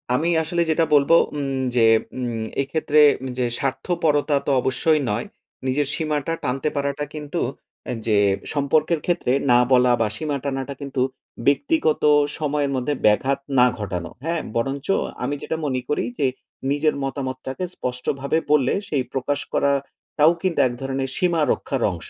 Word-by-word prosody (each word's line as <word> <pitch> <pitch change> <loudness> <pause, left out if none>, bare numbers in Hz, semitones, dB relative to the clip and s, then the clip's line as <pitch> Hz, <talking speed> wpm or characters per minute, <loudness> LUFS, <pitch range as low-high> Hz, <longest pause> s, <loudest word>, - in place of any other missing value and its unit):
আমি 165 +6 +1
আসলে 170 +2 -1
যেটা 160 +1 +3
বলবো, 145 +3 +5 0.2
উম 140 -2 -2 0.2
যে 115 -2 +5 0.3
উম 120 -3 -3 0.2
এক্ষেত্রে 150 +2 +1 0.4
যে 125 - +1
স্বার্থপরতা 150 +1 0
তো - - +1
অবশ্যই 150 +5 +2
নয়। 105 +4 -1 0.4
নিজের 140 +2 +1
সীমাটা 155 0 -1
টানতে 135 +4 -1
পারাটা 140 0 -1
কিন্তু 150 +2 -4 0.6
যে, 105 -2 +3 0.4
সম্পর্কের 155 +3 +1
ক্ষেত্রে 175 -8 0 0.2
না 120 - +6
বলা 125 -1 +5
বা 110 - +3
সীমা 150 -2 -2
টানাটা 135 0 -3
কিন্তু, 140 -2 -3 0.5
ব্যক্তিগত 160 - +2 0.3
সময়ের 145 -2 -1
মধ্যে 130 +3 -1
ব্যাঘাত 130 +6 +3 0.2
না 125 - +7
ঘটানো। 90 -5 -4 0.2
হ্যাঁ? 165 -1 -1
বরঞ্চ 135 +4 -2 0.4
আমি 145 +3 -1
যেটা 160 - -3
মনে 130 -3 -1
করি 150 - 0 0.2
যে, 140 - +3 0.4
নিজের 150 +1 +1
মতামতটাকে 135 +2 -4
স্পষ্টভাবে 135 +4 -2
বললে, 150 -4 +4
সেই 140 -4 0
প্রকাশ 140 +2 -1
করা 140 - +3 0.5
টাও 155 +3 +6
কিন্তু 185 -3 0
এক 120 - -4
ধরণের 135 0 -2
সীমা 175 -3 +1
রক্ষার 135 -3 -2
অংশ। 85 - -8
140 Hz, 145 wpm, -22 LUFS, 130-155 Hz, 0.6 s, না